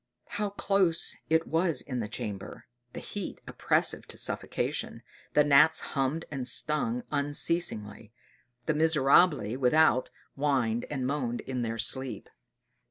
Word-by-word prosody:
How 205 -1 -2
close 195 -4 +1
it 160 +1 +2
was 165 0 0
in 130 -3 -4
the 110 - -3
chamber! 105 -3 -6 0.3
The - - -6
heat 205 -3 -6
oppressive - - 0
to - - -9
suffocation - - -2 0.3
the 150 - +5
gnats 145 +2 +5
hummed 140 +4 -1
and 135 -4 -3
stung 230 - 0
unceasingly 145 -7 -2 0.5
the 155 - +1
"miserabili" 150 - +3
without 130 0 +3 0.2
whined 130 -5 0
and 135 -3 -3
moaned 130 -3 -2
in 130 -2 -4
their 115 -1 -3
sleep. 130 +3 -2
140 Hz, 125 wpm, -29 LUFS, 125-160 Hz, 0.5 s, the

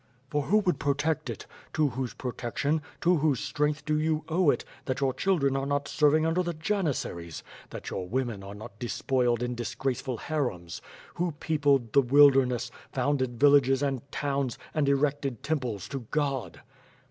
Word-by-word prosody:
For 145 - +1
who 210 - +4
would 180 -8 0
protect 140 +2 0
it? - - -6 0.3
To 155 -2 +2
whose 130 0 -4
protection, 130 +5 -2 0.2
to 175 +1 +4
whose 145 -4 +2
strength 150 +1 -1
do 150 0 +1
you 155 0 0
owe 165 0 +3
it, - - +1 0.2
that 130 -1 -2
your 135 -2 +1
children 140 -3 +1
are 135 0 -1
not 145 0 0
serving 150 +1 +3
under 165 +3 +2
the 175 -2 -3
janissaries? 155 - -2 0.3
That - - -7
your 90 - -4
women 120 -2 -2
are 100 +1 -8
not 105 0 -11
despoiled 125 -1 0
in 125 0 -2
disgrace 120 +2 -2
ful 130 -3 -3
harems? 105 - -3 0.4
Who 175 -1 0
peopled 145 -6 +1
the 140 - +7
wilderness, 130 -3 +5 0.2
founded 130 -3 0
villages 140 -1 +5
and 135 -3 0
towns, 140 -4 -1 0.2
and 150 -3 +1
ereotcd 140 -2 0
temples 125 - -2
to 135 - -3
God?" 140 -4 -2
140 Hz, 165 wpm, -28 LUFS, 125-150 Hz, 0.4 s, the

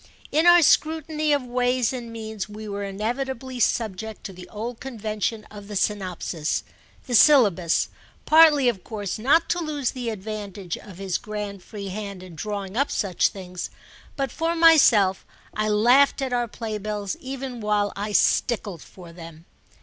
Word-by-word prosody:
In 315 +3 +3
our 345 -1 +8
scrutiny 310 0 +2
of 285 -2 +2
ways 250 0 +1
and 240 -2 -6
means 220 -2 -6
we 215 +1 -8
were 200 0 -4
inevitably 245 +5 -4
subject 220 -2 -1
to 195 - -7
the 180 0 -12
old 225 +2 -6
convention 220 -3 -3
of 205 -1 -10
the 205 - -7
synopsis, 185 -6 -2 0.4
the 250 - -5
syllabus, 210 - +5 0.4
partly 305 -4 +6
of 210 -7 0
course 205 -2 -5
not 295 +9 +3
to 350 - 0
lose 295 -6 -2
the 245 -2 -4
advantage 200 -3 -5
of 190 -4 -12
his 195 -2 -2
grand 210 -3 -6
free 200 +1 -8
hand 200 -1 -6
in 185 -2 -11
drawing 200 +3 -5
up 280 +4 +1
such 190 -5 +1
things; 180 -2 -7 0.5
but 275 -3 -2
for 330 +4 -1
myself 275 - +5 0.3
I 215 0 -1
laughed 245 +8 +4
at 260 -2 -2
our 240 -1 0
playbills 210 -3 -4
even 265 -2 -6
while 210 -1 0
I 205 +2 -4
stickled 205 -4 +1
for 175 -3 -13
them. 165 -1 -12
215 Hz, 155 wpm, -24 LUFS, 200-255 Hz, 0.5 s, our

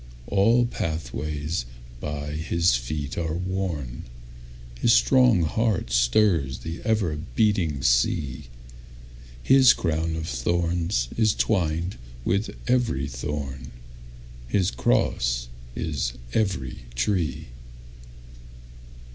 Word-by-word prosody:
All 115 - +3
pathways 75 - -3 0.3
by 75 +2 -4
his 80 +1 +1
feet 70 +5 -3
are 80 -2 -2
worn, 90 -8 -3 0.7
His 115 - +4
strong 125 -5 +5
heart 100 - 0
stirs 65 - +2
the 80 +1 -6
ever 105 -8 +1 0.2
beating 90 - +1
sea, 60 +2 +1 1.0
His 130 - +7
crown 80 -1 -1
of 80 0 -4
thorns 85 +2 0
is 110 -3 +3
twined 85 - 0 0.3
with 100 +4 +1 0.2
every 120 - +1
thorn, 70 -1 -5 0.7
His 95 +7 +1
cross - - +1 0.3
is 70 -7 -2 0.2
every 95 - -1 0.2
tree. 85 +2 -1
80 Hz, 90 wpm, -25 LUFS, 65-95 Hz, 1.0 s, His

